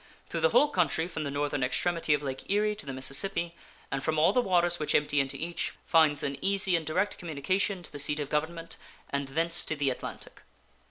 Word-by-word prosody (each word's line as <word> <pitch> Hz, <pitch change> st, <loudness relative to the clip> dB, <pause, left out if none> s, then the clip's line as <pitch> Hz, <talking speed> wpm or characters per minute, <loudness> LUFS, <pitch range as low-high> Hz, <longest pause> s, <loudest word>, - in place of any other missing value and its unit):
Through -, -, -2 dB
the 485 Hz, -, +4 dB
whole 295 Hz, -, +5 dB
country 170 Hz, -, +1 dB
from 165 Hz, -3 st, -4 dB
the -, -, -2 dB
northern 145 Hz, 0 st, -1 dB
extremity 160 Hz, +4 st, +1 dB
of 145 Hz, -, -5 dB
Lake 135 Hz, -1 st, -5 dB
Erie 210 Hz, +1 st, +2 dB
to 210 Hz, -7 st, -8 dB
the -, -, -3 dB
Mississippi, 170 Hz, +7 st, -2 dB, 0.4 s
and 135 Hz, 0 st, -2 dB
from 155 Hz, +3 st, 0 dB
all 160 Hz, +5 st, +4 dB
the 250 Hz, -, +4 dB
waters 175 Hz, -4 st, +2 dB
which 150 Hz, -, 0 dB
empty 145 Hz, 0 st, +2 dB
into 135 Hz, -1 st, -1 dB
each, 170 Hz, +1 st, -3 dB
finds 155 Hz, -3 st, +4 dB
an 140 Hz, -1 st, -2 dB
easy 195 Hz, -1 st, +2 dB
and 165 Hz, -, 0 dB
direct 185 Hz, +6 st, 0 dB
communication 180 Hz, +4 st, -1 dB
to -, -, -10 dB
the 145 Hz, -, -7 dB
seat 150 Hz, +1 st, +3 dB
of 145 Hz, -, -2 dB
Government, 165 Hz, +3 st, -3 dB, 0.3 s
and 140 Hz, 0 st, -1 dB
thence 165 Hz, +5 st, 0 dB
to 160 Hz, -, -2 dB
the 140 Hz, -3 st, +1 dB
Atlantic. 125 Hz, -, -8 dB
160 Hz, 215 wpm, -29 LUFS, 145-180 Hz, 0.4 s, whole